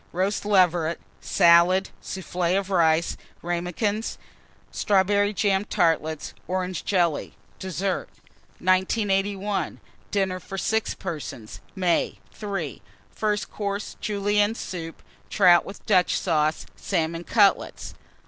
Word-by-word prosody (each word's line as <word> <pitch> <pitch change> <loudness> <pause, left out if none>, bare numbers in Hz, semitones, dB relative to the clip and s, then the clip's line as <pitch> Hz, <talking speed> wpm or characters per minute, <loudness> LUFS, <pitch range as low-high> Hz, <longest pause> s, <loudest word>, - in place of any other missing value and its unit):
Roast 190 +4 -1
Leveret. 175 -5 +3 0.2
Salad. 175 +1 +4
Soufflé 180 0 -1
of 195 0 -3
Rice. 165 -2 +3 0.3
Ramekins. 180 +6 -2 0.5
Strawberry 205 +1 +2
jam 200 -1 +1
Tartlets. 165 -6 0
Orange 185 0 -2
Jelly. 175 -6 0 0.2
DESSERT. 190 0 -2 0.5
1981. 195 +1 0 0.3
DINNER 190 -2 0
FOR 195 +2 -8
6 220 +3 0
PERSONS 130 -8 -7 0.2
(May). 180 -3 +1 0.2
III. 195 - -4 0.3
FIRST 210 -1 -2
COURSE. 200 -1 -4
Julienne 205 +1 +1
Soup. 165 -6 -6 0.3
Trout 180 -4 +5
with 195 - -10
Dutch 185 -4 +3
Sauce. 155 -3 0
Salmon 165 +1 -2
Cutlets. 200 0 +2
185 Hz, 100 wpm, -25 LUFS, 170-200 Hz, 0.5 s, Trout